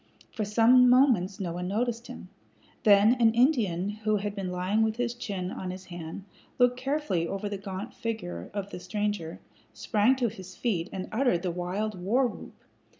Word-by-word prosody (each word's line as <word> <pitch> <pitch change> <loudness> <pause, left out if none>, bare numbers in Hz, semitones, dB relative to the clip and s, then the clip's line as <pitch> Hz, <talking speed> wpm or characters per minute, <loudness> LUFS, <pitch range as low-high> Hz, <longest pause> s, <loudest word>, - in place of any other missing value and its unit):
For 215 - -3
some 240 +4 +5
moments 240 -8 +4
no 175 -4 -3
one 180 +1 -4
noticed 235 +4 -2
him. 240 -7 -10 0.6
Then 205 +2 +7
an 225 -1 +5
Indian 220 - +2
who 215 0 -1
had 205 0 -2
been 195 -3 -4
lying 185 +4 0
with 220 0 +1
his 240 0 -1
chin 195 -6 -4
on 185 - -5
his 185 +1 -7
hand, 175 +1 -7 0.3
looking 245 0 +4
carefully 265 - -1
over 195 +3 -3
the 200 -1 -4
gaunt 195 +3 -6
figure 205 - -5
of 200 -1 -5
the - - -6
stranger, 185 -2 -3 0.3
sprang 220 +3 +2
to 250 -2 0
his 190 -4 -9
feet, 180 -8 -1
and 190 -1 -5
uttered 220 -7 +1
the 180 - -1
wild 185 +3 -3
war 240 +9 +2
whoop. 245 - -6
205 Hz, 180 wpm, -28 LUFS, 185-235 Hz, 0.6 s, Then